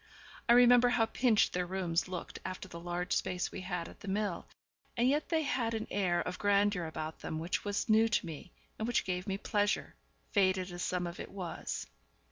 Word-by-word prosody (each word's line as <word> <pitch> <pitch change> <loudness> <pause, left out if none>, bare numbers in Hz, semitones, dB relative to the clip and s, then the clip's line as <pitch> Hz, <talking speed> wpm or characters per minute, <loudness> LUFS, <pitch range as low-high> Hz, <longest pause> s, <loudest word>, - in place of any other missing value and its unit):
I - - +9
remember 245 0 +7
how 245 -2 +3
pinched 225 -1 +2
their 180 0 -1
rooms 180 -2 0
looked 185 -1 -6
after 185 0 -5
the 170 -2 -8
large 175 +1 -2
space 180 -1 -1
we 190 - -6
had 180 -2 -3
at - - -13
the - - -11
mill, 200 -2 -1 0.5
and 240 +1 +3
yet 295 +3 +1
they 320 -2 +2
had 235 -5 0
an 220 - -2
air 185 -4 +1
of 180 0 -4
grandeur 205 -3 +2
about 160 0 -5
them 160 - -4
which 165 +3 -2
was 205 +4 -1
new 220 0 +5
to 215 -4 +1
me, 165 +2 -8 0.3
and 220 - -1
which 240 - +1
gave 180 0 -2
me 195 -1 -1
pleasure, 205 0 0 0.4
faded 185 -2 +2
as 175 0 -6
some 180 0 -1
of 175 0 -6
it - - -6
was. 180 -4 -5
190 Hz, 205 wpm, -32 LUFS, 180-220 Hz, 0.5 s, I